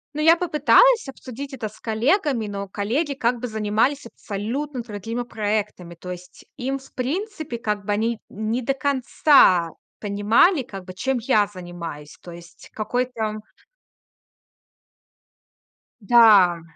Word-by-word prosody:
Ну, 305 Hz, -, -2 dB
я 325 Hz, +2 st, +6 dB
попыталась 360 Hz, -, +4 dB
обсудить 270 Hz, +1 st, -9 dB
это 235 Hz, -4 st, -4 dB
с 210 Hz, -, -14 dB
коллегами, 240 Hz, -, 0 dB
но 200 Hz, -1 st, -6 dB
коллеги, 260 Hz, -, -2 dB
как 240 Hz, -2 st, -1 dB
бы, 250 Hz, -, -4 dB
занимались 220 Hz, +6 st, 0 dB
абсолютно 240 Hz, +6 st, -5 dB
другими 225 Hz, +2 st, -5 dB
проектами. 210 Hz, -6 st, -3 dB
То 180 Hz, +2 st, -10 dB
есть 180 Hz, 0 st, -11 dB
им, 270 Hz, +1 st, -3 dB
в 265 Hz, -, -18 dB
принципе, 315 Hz, -, -4 dB
как 210 Hz, -3 st, -3 dB
бы, 205 Hz, -, -2 dB
они 225 Hz, +2 st, -1 dB
не 220 Hz, +4 st, -3 dB
до 270 Hz, +3 st, 0 dB
конца 260 Hz, -, +3 dB, 0.3 s
понимали, 220 Hz, -, +3 dB
как 195 Hz, -6 st, -10 dB
бы, 185 Hz, -, -9 dB
чем 265 Hz, +7 st, -1 dB
я 220 Hz, -3 st, +2 dB
занимаюсь. 170 Hz, -5 st, -8 dB
То 175 Hz, -, -11 dB
есть 170 Hz, -1 st, -14 dB
какой-то 220 Hz, -1 st, -2 dB, 2.6 s
Да. 200 Hz, -6 st, +6 dB
230 Hz, 130 wpm, -22 LUFS, 205-270 Hz, 2.6 s, я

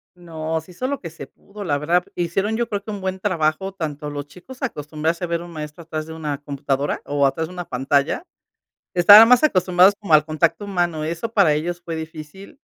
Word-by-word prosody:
No, 160 Hz, -2 st, -4 dB
se 170 Hz, -, -16 dB
hizo 215 Hz, +9 st, -5 dB
lo 280 Hz, +1 st, -2 dB
que 165 Hz, -, -6 dB
se 165 Hz, -, -10 dB
pudo, 205 Hz, +1 st, -12 dB
la 145 Hz, -6 st, 0 dB
verdad, 170 Hz, +4 st, +1 dB
hicieron, 195 Hz, +5 st, -1 dB
yo 235 Hz, 0 st, -1 dB
creo 205 Hz, -3 st, -3 dB
que 215 Hz, -, -7 dB
un 205 Hz, -, -6 dB
buen 190 Hz, 0 st, -3 dB
trabajo, 185 Hz, 0 st, -1 dB
tanto 150 Hz, -4 st, -5 dB
los 145 Hz, 0 st, -6 dB
chicos 185 Hz, -, -14 dB
acostumbrarse 160 Hz, -, -3 dB
a -, -, -1 dB
ver 170 Hz, 0 st, -2 dB
un 175 Hz, -, -10 dB
maestro 150 Hz, 0 st, -8 dB
atrás 155 Hz, -1 st, -4 dB
de 160 Hz, -, -9 dB
una 150 Hz, -3 st, -4 dB
computadora 140 Hz, 0 st, -2 dB
o 145 Hz, -1 st, +1 dB
atrás 160 Hz, +4 st, 0 dB
de 180 Hz, -, -12 dB
una 175 Hz, -1 st, -6 dB
pantalla. 140 Hz, -, 0 dB, 0.7 s
Estaban 205 Hz, +6 st, +9 dB
más 250 Hz, +3 st, +6 dB
acostumbrados 185 Hz, -, +4 dB
como 195 Hz, -7 st, +2 dB
al 150 Hz, -1 st, +6 dB
contacto 160 Hz, +5 st, 0 dB
humano, 175 Hz, -5 st, -1 dB
eso 170 Hz, +8 st, -4 dB
para 195 Hz, -8 st, +4 dB
ellos 175 Hz, +3 st, -3 dB
fue 170 Hz, -1 st, -6 dB
difícil. 160 Hz, -, -9 dB
170 Hz, 210 wpm, -21 LUFS, 155-190 Hz, 0.7 s, Estaban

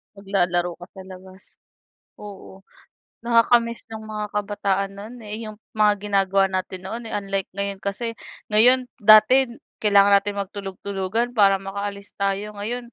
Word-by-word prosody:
Maglalaro 180 Hz, -3 st, -1 dB
ka 175 Hz, -, -9 dB
sa 190 Hz, -, -10 dB
labas. 190 Hz, 0 st, -13 dB, 0.8 s
Oo, 195 Hz, -1 st, -12 dB, 0.6 s
nakaka-miss 235 Hz, 0 st, +3 dB
yung 220 Hz, -1 st, -8 dB
mga 215 Hz, -1 st, -4 dB
kabataan 200 Hz, -1 st, -1 dB
no'n, 210 Hz, +4 st, -9 dB
eh, 215 Hz, +2 st, -5 dB
yung 215 Hz, -, -10 dB, 0.2 s
mga 210 Hz, -1 st, +4 dB
ginagawa 195 Hz, -1 st, +2 dB
natin 185 Hz, 0 st, -4 dB
noon, 230 Hz, +5 st, -5 dB
eh, -, -, -8 dB
unlike 195 Hz, -1 st, -3 dB
ngayon 200 Hz, 0 st, -3 dB
kasi, 230 Hz, +4 st, -3 dB, 0.4 s
ngayon 250 Hz, +4 st, +5 dB, 0.2 s
dati 215 Hz, +5 st, +7 dB, 0.3 s
kailangan 200 Hz, -1 st, +5 dB
natin 205 Hz, 0 st, -4 dB
magtulog-tulugan 200 Hz, +3 st, -4 dB
para 200 Hz, -3 st, +5 dB
makaalis 200 Hz, +1 st, -6 dB
tayo 200 Hz, +1 st, -2 dB
ngayon 235 Hz, +4 st, -5 dB
200 Hz, 135 wpm, -22 LUFS, 195-215 Hz, 0.8 s, dati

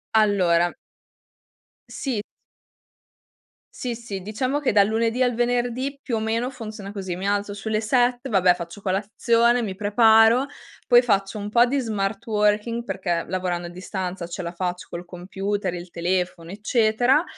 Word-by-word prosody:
Allora 180 Hz, -5 st, +3 dB, 1.1 s
Sì. 245 Hz, -7 st, -3 dB, 1.5 s
Sì, 245 Hz, -2 st, -3 dB
sì, 215 Hz, -5 st, -6 dB
diciamo 255 Hz, +8 st, -2 dB
che 290 Hz, -, +1 dB
dal 200 Hz, -1 st, +5 dB
lunedì 230 Hz, +3 st, +1 dB
al 245 Hz, -, +2 dB
venerdì, 245 Hz, +3 st, -1 dB
più 245 Hz, -5 st, -2 dB
o -, -, -1 dB
meno 230 Hz, +4 st, -1 dB
funziona 215 Hz, -5 st, -8 dB
così: 190 Hz, -4 st, -4 dB
mi 185 Hz, -, -5 dB
alzo 205 Hz, 0 st, -1 dB
sulle 215 Hz, +1 st, -2 dB
7, 245 Hz, +2 st, +1 dB
vabbè, 185 Hz, -5 st, +4 dB
faccio 170 Hz, +2 st, -8 dB
colazione, 230 Hz, +5 st, +2 dB
mi 195 Hz, -4 st, -3 dB
preparo, 225 Hz, +4 st, +5 dB, 0.4 s
poi 245 Hz, -1 st, +7 dB
faccio 200 Hz, -3 st, 0 dB
un 205 Hz, 0 st, -4 dB
po' 240 Hz, +3 st, +5 dB
di 275 Hz, +3 st, 0 dB
smart 215 Hz, -3 st, -2 dB
working, 210 Hz, +2 st, +1 dB
perché 175 Hz, -7 st, -2 dB
lavorando 180 Hz, -1 st, -2 dB
a -, -, -6 dB
distanza 185 Hz, -1 st, -5 dB
ce 175 Hz, +2 st, -5 dB
la 170 Hz, -, -4 dB
faccio 180 Hz, 0 st, -3 dB
col 175 Hz, +1 st, -6 dB
computer, 190 Hz, +2 st, -3 dB
il 175 Hz, 0 st, -7 dB
telefono, 175 Hz, 0 st, -2 dB
eccetera. 230 Hz, -, +2 dB
210 Hz, 150 wpm, -23 LUFS, 185-235 Hz, 1.5 s, poi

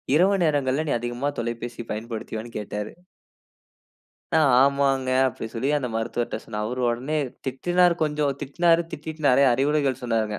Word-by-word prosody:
இரவு 195 Hz, +5 st, +4 dB
நேரங்கள்ல 145 Hz, 0 st, +1 dB
நீ -, -, +2 dB
அதிகமாக 120 Hz, +4 st, -3 dB
தொலைபேசி 120 Hz, 0 st, -4 dB
பயன்படுத்துவியான்னு 110 Hz, +1 st, -5 dB
கேட்டாரு. 105 Hz, 0 st, -5 dB, 1.4 s
நா -, -, +5 dB, 0.2 s
ஆமாங்க 135 Hz, -2 st, +2 dB, 0.2 s
அப்டி 125 Hz, -, -4 dB
சொல்லி 125 Hz, +4 st, -2 dB
அந்த 130 Hz, -4 st, -2 dB
மருத்துவர்ட்ட 115 Hz, +1 st, -2 dB
சொன்னேன். 105 Hz, -1 st, -4 dB
அவர் 125 Hz, +4 st, -3 dB
உடனே 130 Hz, +6 st, -1 dB, 0.3 s
திட்டினாரு 175 Hz, +7 st, +2 dB
கொஞ்சம் 150 Hz, -2 st, +1 dB
திட்னாரு. 165 Hz, +4 st, +2 dB
திட்டிட்டு 155 Hz, 0 st, -7 dB
நிறைய 135 Hz, +2 st, +5 dB
அறிவுரைகள் 135 Hz, 0 st, +1 dB
சொன்னாருங்க. 110 Hz, -3 st, -1 dB
130 Hz, 135 wpm, -24 LUFS, 120-150 Hz, 1.4 s, நா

